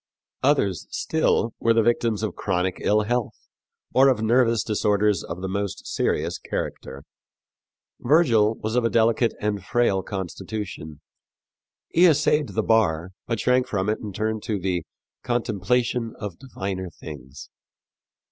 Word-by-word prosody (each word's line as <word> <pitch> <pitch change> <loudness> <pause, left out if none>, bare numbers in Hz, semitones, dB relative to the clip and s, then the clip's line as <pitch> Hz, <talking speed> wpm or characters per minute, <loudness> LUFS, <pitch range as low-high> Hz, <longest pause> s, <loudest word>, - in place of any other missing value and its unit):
Others, 125 - +1
still, 140 -7 0
were 115 0 +3
the 115 - +4
victims 115 -2 +1
of - - -1
chronic 90 +1 -1
ill 105 +1 +2
health, 120 +2 -1 0.6
or 135 +1 +6
of 120 -4 +1
nervous 115 0 +3
disorders 105 -2 +1
of 85 +2 -7
the - - -1
most 100 0 -3
serious 85 +3 -1
character. 70 +1 -5 1.0
Virgil 120 -7 +3
was 110 +1 -4
of 125 - +2
a 115 - +2
delicate 115 0 +2
and 105 -2 -2
frail 120 -4 +1
constitution. 95 -5 -6 0.9
He 175 +2 +5
essayed 150 -1 +3
the 110 - +1
bar, 95 -7 +2 0.2
but 115 -2 -1
shrank 125 0 +2
from 100 -4 -1
it 110 - 0
and 105 -4 -7
turned 110 +1 -1
to 110 -4 -1
the 90 -3 -2 0.3
"contemplation 120 +1 -1
of 105 -5 -7
diviner 95 -8 -5
things." 70 -4 -11
110 Hz, 140 wpm, -24 LUFS, 95-120 Hz, 1.0 s, or